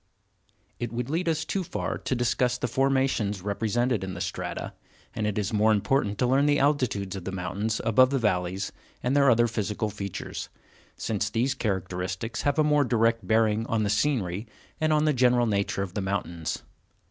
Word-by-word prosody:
It 120 -2 -3
would 120 +3 -3
lead 170 +2 0
us 160 -1 0
too 195 - -1
far - - -3
to 130 - -2
discuss 125 0 +1
the 125 - -2
formations 130 -7 +1
represented 110 +2 0
in 95 -1 -5
the - - -6
strata, - - -4 0.4
and 110 -1 -1
it 105 - -2
is 105 0 -1
more 110 +1 +4
important 105 0 +1
to 125 - +2
learn 135 +3 +3
the 145 0 +4
altitudes 125 -10 +1
of 95 - -6
the 95 - -4
mountains 95 +4 -2
above 130 +3 +5
the 140 - +1
valleys, 95 -5 0 0.3
and 125 +3 +1
their 140 -1 +5
other 120 -1 +5
physical 110 -1 -2
features, 100 -2 -5 0.5
since 100 -2 -1
these 120 +6 +1
characteristics 95 -1 -3
have 145 +1 +1
a 155 - +5
more 150 -1 +4
direct 115 -4 +1
bearing 110 0 +3
on 110 -1 +1
the 100 - +1
scenery 105 -4 0 0.3
and 155 0 +2
on 155 0 +3
the 155 - +3
general 125 -1 +4
nature 100 -2 0
of 95 -2 -7
the 105 - -2
mountains. 90 -4 -3
115 Hz, 185 wpm, -27 LUFS, 100-130 Hz, 0.5 s, above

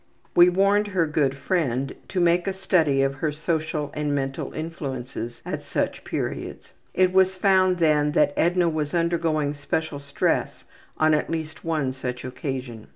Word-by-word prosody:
We 175 +1 +8
warned 200 +3 +3
her 185 -5 +1
good 145 -3 0
friend 140 -5 -1
to 185 - -2
make 175 +1 +3
a 195 - 0
study 165 -8 +2
of 135 0 +1
her 155 - +1
social 155 -1 -2
and 150 -1 -1
mental 135 -1 -3
influences 130 -7 -5
at - - -4
such - - -2
periods. - - -5 0.2
It 185 0 +3
was 190 0 +4
found 185 -1 +3
then 150 -3 +2
that 145 -1 +3
Edna 175 +1 +2
was 155 -1 -1
undergoing 165 -3 +1
special 145 +1 -3
stress 140 0 -1 0.3
on 155 0 +4
at 150 - 0
least 160 -1 -4
one 155 -5 0
such 125 -1 -5
occasion. 125 - -5
155 Hz, 160 wpm, -24 LUFS, 140-175 Hz, 0.3 s, We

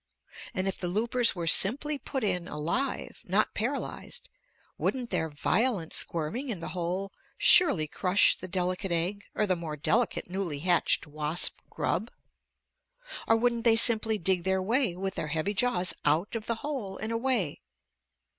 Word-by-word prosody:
And 185 +1 -1
if 195 - -3
the 180 - -3
loopers 230 +5 +2
were 170 -2 -4
simply 275 - +3
put 265 -2 -4
in 180 -4 -1
alive, 170 - -3
not - - 0
paralyzed, - - -4 0.5
wouldn't 250 -3 -2
their 165 -3 0
violent 185 - 0
squirming 170 - -2
in 210 -7 -3
the 165 - -6
hole 180 +3 -3 0.3
surely 205 - +6
crush 180 +5 +3
the 185 - -8
delicate 185 +1 -2
egg 180 +5 -1
or 210 - +1
the 185 -2 +1
more 160 -3 -6
delicate 225 +10 0
newly 180 -4 -3
hatched 175 0 +2
wasp 150 +2 -1
grub? - - -2 1.2
Or 225 - +4
wouldn't 235 0 0
they 230 -2 +5
simply 225 -1 +4
dig 185 -1 +1
their 190 +1 +1
way 220 0 0
with 190 +1 -4
their 155 - -4
heavy 160 +6 -2
jaws 190 -5 +2
out 155 +7 +1
of 220 -1 -5
the 230 - 0
hole 245 -10 -4
and 220 +1 -4
away? 230 - -1
190 Hz, 155 wpm, -28 LUFS, 170-230 Hz, 1.2 s, surely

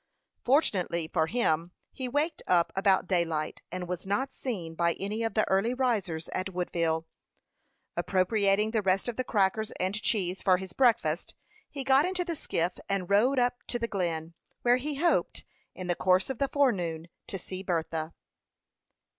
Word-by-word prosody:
Fortunately 185 - +1
for 160 - +1
him 175 -6 0 0.2
he 255 -2 -4
waked 295 +5 0
up 175 -2 +3
about 195 -1 +3
daylight, 165 -4 -1
and 180 0 -4
was 180 +1 -4
not 265 +7 -1
seen 185 -11 -4
by 170 +1 +2
any 210 +3 -4
of 225 -3 -2
the 215 - +2
early 200 +6 +2
risers 205 -11 0
at 185 +1 -2
Woodville. 165 -3 -1 0.9
Appropriating 200 +2 +2
the 220 -2 +1
rest 195 +1 +1
of 240 - -2
the 255 - -1
crackers 215 -1 +1
and 185 +1 0
cheese 190 -5 0
for 185 -2 +4
his 190 -1 -8
breakfast, 225 -10 +2 0.3
he 275 -2 -5
got 270 +1 +5
into 360 +1 -1
the 340 -2 -2
skiff 175 - -1
and 195 -1 -1
rowed 245 +7 +4
up 245 0 +1
to 240 - -1
the 230 -1 -2
Glen, 170 -5 -2 0.3
where 245 +1 +5
he 290 +3 -3
hoped, 335 +5 +1 0.3
in 185 - -6
the 175 - +1
course 185 +7 +2
of 260 - -7
the 275 - +1
forenoon, 175 - +1 0.2
to 195 - -4
see 185 +1 -6
Bertha. 165 -3 -2
195 Hz, 170 wpm, -29 LUFS, 175-245 Hz, 0.9 s, got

